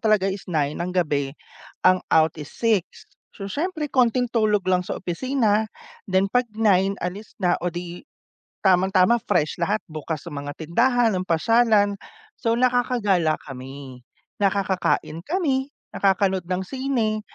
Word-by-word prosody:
talaga 210 -3 +3
is 195 0 -7
9 150 -3 0
ng 175 - -2
gabi 145 -6 0 0.5
ang 185 0 +5
out 160 -1 +5
is 145 - -7
6. 215 -6 -1 0.3
So 195 - -7
siyempre, 315 - -2
konting 250 -1 +3
tulog 215 -4 +2
lang 185 -1 +3
sa - - -3
opisina, 220 +3 0 0.4
then 190 +1 +2
'pag 250 0 +2
9 195 -3 +3
alis 195 +5 -6
na 180 -3 +1
o 180 - 0
‘di 175 - -7 0.6
tamang 190 0 +4
tama, 190 +5 +5
fresh 155 - 0
lahat 205 +5 +1
bukas 155 0 -5
ang 140 -1 -5
mga 145 - -5
tindahan, 235 +9 +2
ang 185 - -3
pasyalan. 205 +2 +3 0.4
So 230 -2 0
nakakagala 240 -10 +2
kami, 135 -1 -9 0.4
nakakakain 190 -4 0
kami, 290 -6 0 0.2
nakakanood 190 -2 +1
ng 180 0 0
sine, 245 -4 -1
195 Hz, 140 wpm, -23 LUFS, 170-230 Hz, 0.6 s, ang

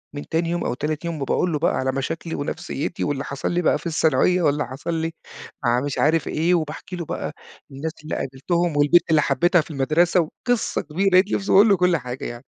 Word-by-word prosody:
من 145 - -6
تاني 165 +1 0
يوم 175 0 -1
أو - - -1
تالت 150 +5 -3
يوم 165 -4 -4
وباقول 175 +5 0
له 150 - -1
بقى - - +1
على 130 0 0
مشاكلي 160 +5 -4
ونفسيّتي 145 +2 -4
واللي 145 -1 -1
حصَل 140 +3 -3
لي 175 +1 +1
بقى - - +2
في - - -15
الثانوية 160 +3 +2
واللي 145 -5 +1
حصَل 135 +6 -5
لي 165 0 -1 0.5
مع 120 +1 +2
مش 145 -1 -3
عارف 160 +1 +2
إيه، 165 +3 +1
وباحكي 160 +3 -4
له 170 -2 -5
بقى - - -4 0.4
الناس 145 +4 -4
اللي 155 - -4
قابِلتهم 155 +4 -1
والبنت 150 +4 +4
اللي 155 -2 +4
حبيتها 170 +5 +3
في 155 - -11
المدرسة 155 +6 +2
وقِصّة 240 +9 -2
كبيرة، 180 +6 0
لقيت 185 +2 +4
نفْسي 195 - -1
باقول 205 +3 +7
له 195 - +5
كلّ 180 -1 +3
حاجة 125 -2 -6
يعني. 120 +2 -7
160 Hz, 215 wpm, -22 LUFS, 140-175 Hz, 0.5 s, باقول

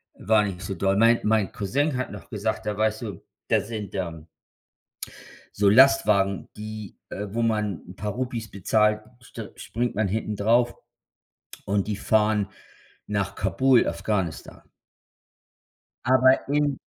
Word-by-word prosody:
war 110 +1 +3
nicht 95 -3 -4
so 95 - -4
doll. 95 +2 +1
Mein 115 +2 +5
mein 110 -2 +2
Cousin 135 +7 -1
hat 130 - -3
noch - - -10
gesagt, 110 -1 -3
da: 105 -1 -2
„Weißt 110 0 0
du, 100 -6 -7 0.3
da - - +4
sind, 105 -2 -6
ähm“ 85 -4 -4 1.3
„so 100 0 +4
Lastwagen, 105 -6 +4
die 105 -1 -8
äh, 105 +1 -5
wo 115 +4 -2
man 105 -6 0
'n 90 - -10
paar 105 +1 -4
Rupees 120 -2 -4
bezahlt, 105 +2 +2 0.2
st 115 -2 -9
springt 120 +1 -3
man 105 0 +1
hinten 105 +1 -2
drauf 120 +3 +2 0.9
und 100 0 0
die 105 - -1
fahren 105 -2 +2 0.6
nach 100 -2 -1
Kabul, 120 +7 +3
Afghanistan.“ 95 -7 -3 1.4
Aber 130 +1 +5
in 145 -1 +1
105 Hz, 140 wpm, -25 LUFS, 100-115 Hz, 1.4 s, Mein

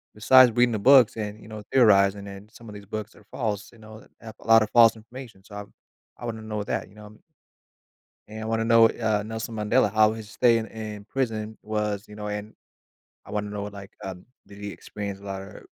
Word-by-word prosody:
besides 125 +3 +6
reading 120 0 +3
the 105 - -1
books 130 0 +6
and, 105 0 -5
you 110 - -14
know, 110 -1 -8
theorizing, 100 -5 +4
and 100 +2 -11
some 115 -2 -14
of 105 - -10
these 100 0 -11
books 110 +2 -6
are 105 - -19
false, 105 -5 -3
you 115 - -18
know, 110 0 -13 0.2
have 110 -2 -10
a - - -14
lot 115 -1 +7
of 105 - -5
false 115 -1 +6
information, 115 -2 -12
so 105 - -13
I - - -5
w 100 - -11 0.5
I 120 - -7
wanna 110 -1 -5
know 105 -1 -4
that, - - -3
you 105 - -21
know, 105 0 -12
and 105 - -17 1.1
and 110 +1 -8
I - - -5
wanna 115 0 -1
know, 115 -1 +6
uh, 110 -3 -1
Nelson 110 +1 -6
Mandela, 105 -1 +1
how 110 0 +4
his 110 -2 -8
stay 115 +2 +3
in 110 - -4
in 105 -2 -8
prison 110 -5 -3
was, 105 -1 -3
you 105 - -12
know? 105 0 -6
And 105 +1 -5 0.7
I - - -17
wanna 105 -1 -3
know 105 -1 -5
what, 105 0 -7
like, 100 -1 -10
um 95 -1 -8 0.2
did 100 - -14
he 100 0 -6
experience 100 -1 -7
a - - -17
lot 95 -1 -5
of - - -11
r - - -13
110 Hz, 240 wpm, -25 LUFS, 105-115 Hz, 1.1 s, lot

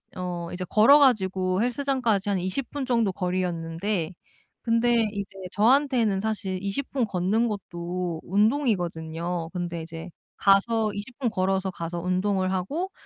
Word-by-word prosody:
어 175 -2 -4
이제 185 +1 -4
걸어 230 +8 +7
가지고 190 -7 +2
헬스장까지 245 -5 0
한 200 - +1
20 190 +9 -3
분 285 -2 -4
정도 230 -5 +2
거리였는데 180 0 -2 0.5
근데 230 -1 +2
이제 200 -1 -5 0.2
저한테는 235 -2 +3
사실 195 -3 -2
20 200 +8 -3
분 260 -4 +1
걷는 205 +4 +1
것도 175 -4 -4
운동이거든요. 175 - 0
근데 175 -2 -3
이제 165 +2 -8 0.3
가서 210 +2 +3
20 210 +5 -7
분 250 -4 +1
걸어서 190 -1 0
가서 170 -1 -5
운동을 185 +2 0
하고 295 - -2
195 Hz, 275 characters per minute, -26 LUFS, 180-230 Hz, 0.5 s, 걸어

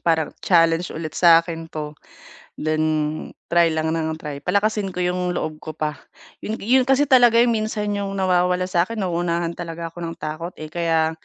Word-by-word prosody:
parang 160 -2 +1
challenge 165 -1 +3
ulit 160 -1 -6
sa 165 -1 +6
akin 165 -1 -6
'to, 150 -2 -6 0.6
then 155 0 -1 0.7
try 170 0 +5
lang 160 0 -1
ng 160 -1 -1
try 150 -3 -7
palakasin 200 +4 0
ko 180 - -1
'yong 180 0 -1
loob 155 -1 -3
ko 155 - -8
pa, 155 -1 -3 0.4
'yon 215 - -4
ga - - -10
'yon 250 +4 +4
kasi 270 +1 +4
talaga 245 -4 +5
'yong 235 +1 +5
minsan 215 -2 -1
'yong 200 -1 -3
nawawala 180 -1 +2
sa 175 0 +2
akin 225 -3 -4
nauunahan 170 -1 -1
talaga 170 -1 -6
ako 175 - -12
ng 165 -1 -5
takot, 165 +2 -6
eh, 155 0 -9
kaya 165 -2 +1
170 Hz, 185 wpm, -22 LUFS, 160-195 Hz, 0.7 s, sa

